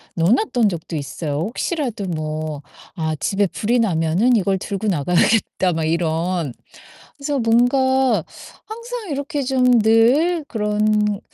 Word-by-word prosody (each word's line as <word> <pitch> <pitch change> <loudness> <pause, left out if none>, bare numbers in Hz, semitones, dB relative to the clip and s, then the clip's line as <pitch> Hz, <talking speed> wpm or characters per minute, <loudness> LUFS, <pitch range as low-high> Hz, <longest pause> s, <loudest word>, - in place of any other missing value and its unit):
넣어 170 +2 +2
놓았던 245 - +2
적도 165 -1 -6
있어요. 145 +1 -4
'혹시라도 240 - -3
뭐 155 -2 -4 0.3
아 160 -2 -2
집에 200 +4 0
불이 235 +7 -1
나면은 185 +4 +2
이걸 195 -1 +1
들고 200 +2 -4
나가야겠다.' 180 +2 +1
막 160 0 -2
이런. 165 -2 -1 0.7
그래서 280 0 -1
뭔가 260 +3 +2 0.4
항상 465 -3 -7
이렇게 285 0 -3
좀 250 -2 +3
늘 265 +10 +3
그런 210 -1 0
210 Hz, 260 characters per minute, -20 LUFS, 165-255 Hz, 0.7 s, 좀